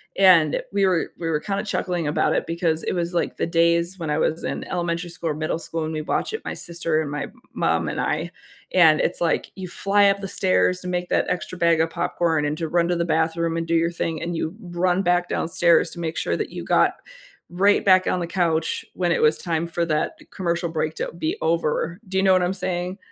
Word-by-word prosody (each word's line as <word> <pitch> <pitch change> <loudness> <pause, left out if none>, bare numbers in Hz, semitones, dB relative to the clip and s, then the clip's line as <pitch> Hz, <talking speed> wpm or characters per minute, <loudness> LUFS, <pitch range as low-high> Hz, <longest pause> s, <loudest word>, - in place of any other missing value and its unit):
and 180 -6 +5
we 200 0 +2
were 180 -3 +1
we 165 - -3
were 155 -2 +1
kinda 200 +4 -3
chuckling 180 -5 -2
about 150 - +1
it - - 0
because 165 -1 0
it - - -1
was 175 -1 -2
like 170 - -1
the - - -1
days 170 +2 +2
when 160 -2 -4
I 150 - +1
was 160 +1 0
in - - -3
elementary 170 0 -2
school 170 -1 -4
or - - -1
middle 155 +1 -2
school 165 -1 -4
and 160 - -4
we'd 155 - -2
watch - - -1
it, 445 - -5
my - - -3
sister 165 -2 -2
and 150 - -4
my 145 0 -3 0.3
mom 80 -1 +1
and - - -4
I, 160 +3 -1 0.5
and 160 -4 +6
it's, 175 - -1
like, 170 - 0
you 190 -1 -6
fly 200 +3 +3
up 195 0 +1
the 195 - -5
stairs 90 - +1
to - - -7
make 180 0 -2
that - - +2
extra 180 0 -3
bag 170 -1 +3
of 165 - +1
popcorn 170 -3 0
and 145 +1 -1
to 165 - -2
run 170 +1 +1
to 175 - +2
the 170 0 0
bathroom 165 0 0
and 165 - -2
do 165 - -1
your 165 +1 +2
thing 165 -2 -3
and 175 0 -3
you 160 +3 -3
run 180 0 0
back 175 -1 +1
downstairs 170 0 +2
to 170 - -6
make 165 -1 -3
sure - - 0
that - - -3
you - - -6
got - - +3 0.6
right 200 +4 +3
back 185 -1 +5
on 180 - +1
the 175 - -2
couch 165 -3 0
when 175 -2 0
it - - +1
was 155 0 +4
time 165 -1 -2
for 170 0 -1
that 155 -2 -1
commercial 170 -2 -1
break 160 -1 -2
to - - -3
be 160 -2 -2
over, 165 +1 0
do 190 0 -3
you 190 - +3
know 190 -1 +5
what 185 - +4
I'm 180 +1 0
saying? 180 0 -3
170 Hz, 240 wpm, -23 LUFS, 160-180 Hz, 0.6 s, and